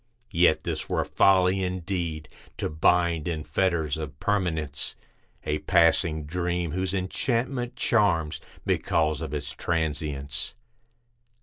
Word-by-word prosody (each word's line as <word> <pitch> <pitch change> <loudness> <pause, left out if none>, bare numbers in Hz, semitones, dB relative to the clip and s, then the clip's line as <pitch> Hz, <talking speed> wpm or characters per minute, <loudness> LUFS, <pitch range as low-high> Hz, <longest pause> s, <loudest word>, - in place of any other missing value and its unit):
Yet, - - +4
this - - -3
were - - +1
folly 95 0 +4
indeed; 90 -4 -3 0.3
to - - -2
bind, 85 0 +2
in 80 -3 -2
fetters 80 -2 0
of 75 -3 -6
permanence, 85 -9 -1 0.5
A 75 0 -1
passing 85 -2 +3
dream 85 +1 -1
whose 95 +2 -1
enchantment 120 +6 -1
charms 90 -9 +2 0.2
because 80 -1 +1
of - - -4
its 70 -1 -3
trancience. 75 -4 -2
85 Hz, 110 wpm, -26 LUFS, 75-95 Hz, 0.5 s, Yet